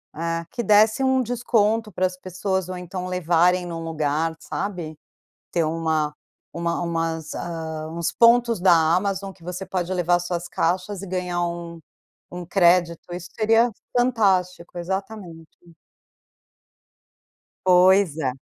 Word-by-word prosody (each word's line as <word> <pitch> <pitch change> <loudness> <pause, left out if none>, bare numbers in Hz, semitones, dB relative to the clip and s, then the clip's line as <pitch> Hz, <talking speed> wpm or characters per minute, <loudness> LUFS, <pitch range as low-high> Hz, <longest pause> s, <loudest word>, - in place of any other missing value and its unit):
É, 165 +1 -2
que 240 - -3
desse 215 +5 +4
um 260 0 +3
desconto 225 -2 +1
para 185 +1 0
as 185 0 -3
pessoas 185 0 -3
ou 185 - -5
então 180 +1 -6
levarem 180 0 +2
num 165 -1 -5
lugar, 160 0 -1
sabe. 170 -5 -5 0.5
Ter 170 -2 +1
uma 155 -2 -1 0.4
uma 170 0 -2
umas, 165 -2 -2
hã, 160 -2 -5
uns 170 0 -2
pontos 235 -3 +4
da 185 -1 +5 0.2
Amazon 195 0 -1
que 180 - -23
você 180 +2 -5
pode 185 -1 -2
levar 175 -1 +2
suas 175 0 -3
caixas 185 +3 -1
e - - -6
ganhar 180 -1 -2
um 170 -1 -6 0.5
um 175 -1 -6
crédito, 175 -2 +2
isso 180 0 -7
seria 225 +2 +4 0.2
fantástico, 190 -8 +1
exatamente. 175 -3 -7 1.9
Pois 185 -2 +5
é. 130 -5 0
180 Hz, 130 wpm, -23 LUFS, 165-195 Hz, 1.9 s, da